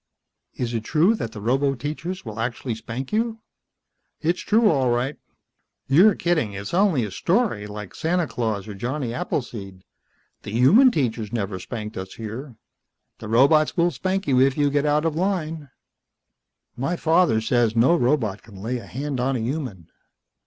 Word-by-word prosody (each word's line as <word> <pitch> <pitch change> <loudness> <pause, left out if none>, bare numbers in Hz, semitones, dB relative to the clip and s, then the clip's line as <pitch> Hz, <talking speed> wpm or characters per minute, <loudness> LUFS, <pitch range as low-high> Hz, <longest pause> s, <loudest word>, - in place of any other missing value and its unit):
"Is 120 -1 -3
it 115 -2 -2
true 165 - +3
that 115 - -4
the 110 - -8
roboteachers 140 - -1
will 110 -1 -7
actually 120 +1 -2
spank 115 - -6
you?" 225 +1 0 0.8
"It's 170 +3 0
true, 220 +1 +3
all 135 -8 +2
right." 125 +4 0 0.7
"You're 180 +9 +6
kidding. 160 -12 0
It's 100 +5 -6
only 175 - +3
a 105 - -7
story, 175 - 0
like 105 -2 -8
Santa 175 +1 0
Claus 110 -8 -3
or 105 - -6
Johnny 120 +4 -3
Appleseed. 100 -8 -4 0.6
The - - -8
human 185 - +6
teachers 115 - -1
never 100 -5 -3
spanked 105 +2 -6
us 95 0 -6
here." 115 +4 -7 0.6
"The 110 - -7
robots 140 +9 +4
will 175 0 +3
spank 190 +2 -2
you 130 -3 +3
if 135 +1 +3
you 145 -1 +2
get 145 +1 +1
out 150 +2 +2
of 160 -2 0
line." 165 -5 -2 1.1
"My 140 +8 -1
father 165 -7 +3
says 115 0 +1
no 125 +9 +5
robot 120 - +1
can 105 -3 -15
lay 115 +6 -3
a - - -12
hand 140 +1 -4
on 130 +2 0
a - - -1
human." 115 - -4
130 Hz, 165 wpm, -23 LUFS, 110-160 Hz, 1.1 s, You're